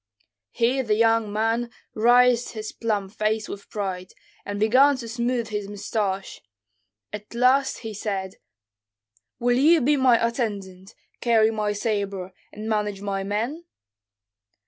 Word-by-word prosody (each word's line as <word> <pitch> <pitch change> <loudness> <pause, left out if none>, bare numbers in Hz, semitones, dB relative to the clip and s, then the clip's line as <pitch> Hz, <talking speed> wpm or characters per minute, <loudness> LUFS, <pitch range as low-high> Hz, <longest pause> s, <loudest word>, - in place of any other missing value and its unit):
Here 245 - +1
the 220 -4 +1
young 225 -1 +2
man 225 +3 0 0.2
raised 245 +2 +4
his 215 -1 -6
plump 205 -4 -2
face 215 0 -1
with 200 - -9
pride, 185 -3 -4 0.3
and 205 0 -4
began 260 +6 +5
to 235 -2 -7
smooth 235 0 -2
his 210 -2 -3
mustaches; 200 -1 -3 0.7
at 210 +2 -8
last 260 +3 +2
he 220 - -4
said, 195 -2 -4 1.0
"Will 245 +1 +2
you 320 +4 +6
be 290 +3 +2
my 255 -3 +5
attendant, 200 -6 -5 0.2
carry 225 -2 +3
my 210 -1 -1
sabre, 200 -3 -3 0.2
and 215 +1 -7
manage 210 -2 -1
my 195 -1 -2
men?" 230 - -3
220 Hz, 130 wpm, -24 LUFS, 205-240 Hz, 1.0 s, you